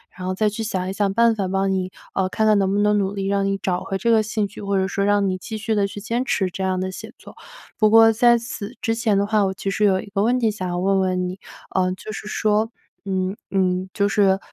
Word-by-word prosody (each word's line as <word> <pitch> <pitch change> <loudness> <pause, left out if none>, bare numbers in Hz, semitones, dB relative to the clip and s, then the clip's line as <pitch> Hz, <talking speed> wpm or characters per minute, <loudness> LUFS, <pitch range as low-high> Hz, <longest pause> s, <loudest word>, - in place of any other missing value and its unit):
然 185 0 -6
后 185 - -1
再 215 +2 +1
去 210 +2 -5
想 185 -4 -2
一 190 - -3
想 200 -1 0
办 230 -1 +4
法， 195 -3 -2
帮 195 +1 0
你， 185 -1 -2 0.2
呃， 190 -1 0
看 220 - 0
看 215 -1 +5
能 190 -1 +1
不 200 - 0
能 210 0 +3
努 195 -1 0
力 195 -1 -3
让 200 0 +1
你 195 0 0
找 180 -2 -2
回 195 - -3
这 235 +4 +1
个 225 -1 +5
兴 215 -1 -1
趣， 200 - -11
或 200 -1 -1
者 190 0 +1
说， 200 - -1
让 205 0 +2
你 185 - 0
继 220 +4 -6
续 220 +1 -2
地 205 -2 +2
去 205 - -8
坚 230 +4 -2
持 190 -7 0
这 190 - -4
样 185 -1 0
的 185 0 -2
写 - - -9
作。 - - -14 0.4
不 215 -1 +5
过 225 +1 +7
在 240 +1 +5
此 230 0 -7
之 225 - +1
前 225 -3 +1
的 200 - +2
话， 210 -1 +2
我 190 - -1
其 195 - -3
实 210 - -1
有 195 -2 +4
一 - - -7
个 195 0 -1
问 245 +4 +2
题 225 -3 +2
想 185 -3 -5
要 175 - -2
问 195 +2 +2
问 185 -1 0
你， 185 +2 -7 0.6
就 215 - -8
是 215 - -7
说， 215 +1 +1 0.4
嗯 190 0 -1
嗯， 185 -1 0
就 200 -1 +2
是 195 -2 +3
200 Hz, 295 characters per minute, -22 LUFS, 190-215 Hz, 0.6 s, 过